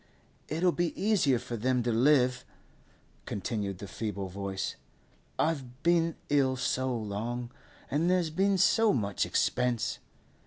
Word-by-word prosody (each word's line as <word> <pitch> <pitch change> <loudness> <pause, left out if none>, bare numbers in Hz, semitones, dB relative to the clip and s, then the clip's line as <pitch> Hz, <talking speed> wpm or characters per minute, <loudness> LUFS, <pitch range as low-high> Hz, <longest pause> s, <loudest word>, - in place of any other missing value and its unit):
'It'll 170 +3 +2
be 175 -1 -2
easier 190 - +3
for 125 0 -5
them 125 +2 +1
to 120 - 0
live,' 125 +1 +3 0.8
continued 100 -1 -3
the 100 - -8
feeble 100 -1 -4
voice. 95 0 -4 0.6
'I've 135 -5 -2
been 165 -1 +3
ill 135 -3 +3
so 130 +1 -1
long, 120 +2 -3 0.4
and 160 +5 +2
there's 180 -3 +2
been 195 +4 +2
so 225 +4 +4
much 100 -6 0
expense. 125 -3 0
125 Hz, 125 wpm, -30 LUFS, 110-165 Hz, 0.8 s, so